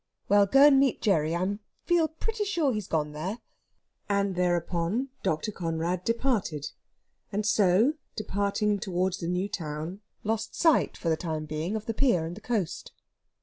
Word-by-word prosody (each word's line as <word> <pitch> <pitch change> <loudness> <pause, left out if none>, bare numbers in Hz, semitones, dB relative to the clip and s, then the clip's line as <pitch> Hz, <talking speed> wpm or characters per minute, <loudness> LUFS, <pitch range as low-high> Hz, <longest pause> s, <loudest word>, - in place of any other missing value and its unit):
"Well, 200 0 +5
go 270 +7 +7
and 280 -2 +7
meet 270 -2 +2
Gerry. 165 -6 +2
I 190 +4 -1 0.3
feel 345 -2 +3
pretty 420 +8 -3
sure 335 -10 +1
he's 210 -3 -3
gone 150 -2 -1
there." 175 +9 -4 0.7
And 200 -1 +1
thereon 175 +6 0
Dr. 190 +2 -1
Conrad 170 0 -2
departed, 230 - 0 0.6
and 210 +1 -1
so, 215 +5 +4 0.2
departing 205 0 0
towards 185 0 -1
the 170 - -4
new 180 +3 0
town, 165 0 -5 0.2
lost 220 +1 -2
sight 325 -3 +3
for 165 - -2
the 160 - +2
time 155 -3 -3
being 155 +6 -3
of 215 -1 -4
the 225 - -2
pier 210 -10 +2
and 170 +2 -5
the 215 - -11
coast. 215 -7 -3
195 Hz, 160 wpm, -28 LUFS, 170-225 Hz, 0.7 s, go